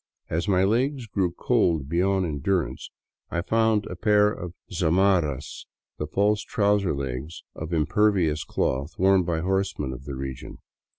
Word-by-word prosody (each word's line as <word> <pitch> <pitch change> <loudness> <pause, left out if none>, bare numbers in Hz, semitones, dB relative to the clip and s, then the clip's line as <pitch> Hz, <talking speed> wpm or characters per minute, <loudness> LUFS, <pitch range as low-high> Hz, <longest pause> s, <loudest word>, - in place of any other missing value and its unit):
As 85 +5 -1
my 95 -2 +3
legs 125 +6 +1
grew 95 -4 -1
cold 85 - +1
beyond 95 +4 +1
endurance, 85 +3 -2 0.4
I 85 - -2
found 110 0 +2
a - - -6
pair 105 +2 +3
of 90 -3 -7 0.2
zamarras, 85 -5 +1 0.3
the 75 - -2
false 105 +6 +1
trouser 100 -6 +1
legs 70 +3 -5
of 80 +1 -7
im 80 -3 +2
pervious 90 -4 +2
cloth 70 +5 -2
worn 95 0 +4
by 85 -2 -1
horsemen 95 -7 -1
of 65 +2 -10
the 70 -2 -5
region. 65 -1 -6
90 Hz, 145 wpm, -25 LUFS, 75-100 Hz, 0.4 s, worn